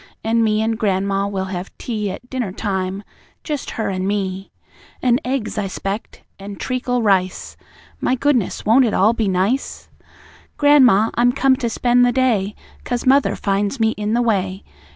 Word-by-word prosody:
An' 230 Hz, +1 st, +2 dB
me 215 Hz, 0 st, +1 dB
and 225 Hz, 0 st, -1 dB
gran'ma 195 Hz, -1 st, 0 dB
will 195 Hz, -1 st, -3 dB
have 180 Hz, +1 st, -5 dB
tea 215 Hz, -4 st, -3 dB
At 195 Hz, +6 st, -8 dB
dinner 245 Hz, -6 st, -3 dB
time 190 Hz, -1 st, -3 dB, 0.4 s
just 295 Hz, -4 st, -4 dB
her 220 Hz, -, -1 dB
an' 185 Hz, 0 st, -2 dB
me 195 Hz, -1 st, -3 dB, 0.5 s
An' 245 Hz, -1 st, +2 dB
eggs, 225 Hz, -5 st, -2 dB
I 200 Hz, -, -2 dB
'spect, 195 Hz, +3 st, -5 dB, 0.2 s
an' 200 Hz, +1 st, -8 dB
treacle 250 Hz, +1 st, -2 dB
rice. 190 Hz, -3 st, 0 dB, 0.4 s
My 255 Hz, -, +1 dB
goodness! 255 Hz, -6 st, 0 dB
Won't 240 Hz, +5 st, +5 dB
it 220 Hz, -, 0 dB
all 215 Hz, +4 st, +4 dB
be 225 Hz, -3 st, -1 dB
nice? 195 Hz, +8 st, -1 dB, 0.7 s
"Gran'ma, 255 Hz, -8 st, +5 dB
I'm 245 Hz, +1 st, +3 dB
come 270 Hz, 0 st, +3 dB
to 235 Hz, -, -2 dB
spend 245 Hz, +2 st, +2 dB
the 245 Hz, -, +4 dB
day, 225 Hz, -6 st, +1 dB, 0.3 s
'Cause 245 Hz, -1 st, -3 dB
mother 270 Hz, +2 st, +3 dB
finds 200 Hz, +5 st, -1 dB
me 220 Hz, 0 st, +3 dB
in 210 Hz, 0 st, -3 dB
the 240 Hz, -, +2 dB
way. 195 Hz, -4 st, -1 dB
220 Hz, 170 wpm, -20 LUFS, 195-245 Hz, 0.7 s, Won't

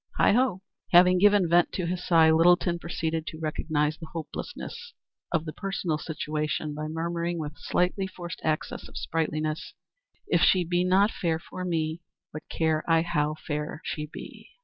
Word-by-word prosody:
Heigho!" 230 Hz, -4 st, +3 dB, 0.3 s
Having 180 Hz, +1 st, +7 dB
given 205 Hz, -2 st, +5 dB
vent 175 Hz, +1 st, +4 dB
to 185 Hz, -, -2 dB
this 180 Hz, +1 st, -3 dB
sigh, 160 Hz, -2 st, +6 dB
Littleton 170 Hz, +1 st, +4 dB
proceeded 160 Hz, -1 st, -3 dB
to 155 Hz, -, -6 dB
recognize 155 Hz, -1 st, -1 dB
the 160 Hz, -, -8 dB
hopelessness 170 Hz, -, -7 dB, 0.4 s
of 165 Hz, -2 st, 0 dB
the 155 Hz, -, -5 dB
personal 185 Hz, -5 st, -2 dB
situation 150 Hz, -1 st, -3 dB
by 155 Hz, +1 st, -4 dB
murmuring 170 Hz, +2 st, -2 dB
with 150 Hz, -2 st, -4 dB
a 150 Hz, -, -23 dB
slightly 185 Hz, +4 st, 0 dB
forced 175 Hz, -2 st, -8 dB
access 155 Hz, -1 st, -2 dB
of -, -, -11 dB
sprightliness 155 Hz, -1 st, -2 dB, 0.5 s
"If -, -, +2 dB
she 185 Hz, -2 st, +5 dB
be 175 Hz, +1 st, +1 dB
not 195 Hz, +4 st, +4 dB
fair 165 Hz, -2 st, -1 dB
for 180 Hz, +2 st, -8 dB
me, 165 Hz, -2 st, -1 dB, 0.3 s
What 155 Hz, +1 st, -9 dB
care 160 Hz, -1 st, 0 dB
I 165 Hz, 0 st, +4 dB
how 155 Hz, -3 st, 0 dB
fair 150 Hz, 0 st, -3 dB
she 150 Hz, -1 st, -4 dB
be?" -, -, -11 dB
165 Hz, 165 wpm, -27 LUFS, 155-180 Hz, 0.5 s, Having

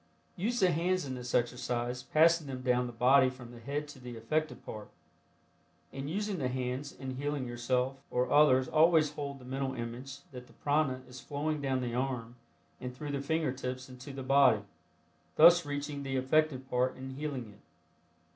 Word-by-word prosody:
Use 235 Hz, +7 st, -1 dB
the 185 Hz, -3 st, +4 dB
hands 180 Hz, +1 st, +1 dB
in 130 Hz, -, -4 dB
this 125 Hz, -1 st, -4 dB
exercise, 120 Hz, 0 st, -1 dB
passing 160 Hz, +3 st, +4 dB
them 130 Hz, -1 st, -6 dB
down 125 Hz, -1 st, +2 dB
the -, -, -6 dB
body 130 Hz, +3 st, +5 dB
from 125 Hz, -2 st, -11 dB
the 120 Hz, -, -11 dB
head 145 Hz, +5 st, -3 dB
to 145 Hz, -2 st, -11 dB
the 125 Hz, -2 st, -8 dB
affected 155 Hz, +7 st, -2 dB
part. 105 Hz, -1 st, -7 dB, 1.0 s
In 135 Hz, +1 st, -5 dB
using 200 Hz, +3 st, -2 dB
the 130 Hz, -, 0 dB
hands 130 Hz, +2 st, -3 dB
in 130 Hz, -1 st, -7 dB
healing 145 Hz, -1 st, -2 dB
yourself 125 Hz, +2 st, -1 dB
or 125 Hz, 0 st, 0 dB
others 130 Hz, -3 st, +5 dB
always 160 Hz, 0 st, +4 dB
hold 140 Hz, -1 st, -5 dB
the 130 Hz, -, -14 dB
mental 130 Hz, +1 st, -3 dB
image 125 Hz, +4 st, -6 dB
that 125 Hz, -1 st, -9 dB
the -, -, -19 dB
prana 145 Hz, -3 st, 0 dB
is 125 Hz, 0 st, -10 dB
flowing 145 Hz, +3 st, -2 dB
down 135 Hz, -2 st, 0 dB
the 120 Hz, -1 st, -3 dB
arm 125 Hz, -2 st, -2 dB, 0.4 s
and 125 Hz, 0 st, -6 dB
through 145 Hz, +1 st, -5 dB
the 140 Hz, -1 st, -2 dB
finger 160 Hz, 0 st, 0 dB
tips 130 Hz, 0 st, -5 dB
into 125 Hz, +2 st, -9 dB
the 135 Hz, 0 st, -6 dB
body, 130 Hz, -5 st, +5 dB, 0.7 s
thus 170 Hz, 0 st, +7 dB
reaching 145 Hz, 0 st, -3 dB
the 135 Hz, -1 st, -3 dB
affected 130 Hz, 0 st, +1 dB
part 125 Hz, 0 st, +1 dB
and 130 Hz, 0 st, -7 dB
healing 140 Hz, -5 st, -4 dB
it. 100 Hz, -, -19 dB
130 Hz, 185 wpm, -31 LUFS, 125-145 Hz, 1.0 s, thus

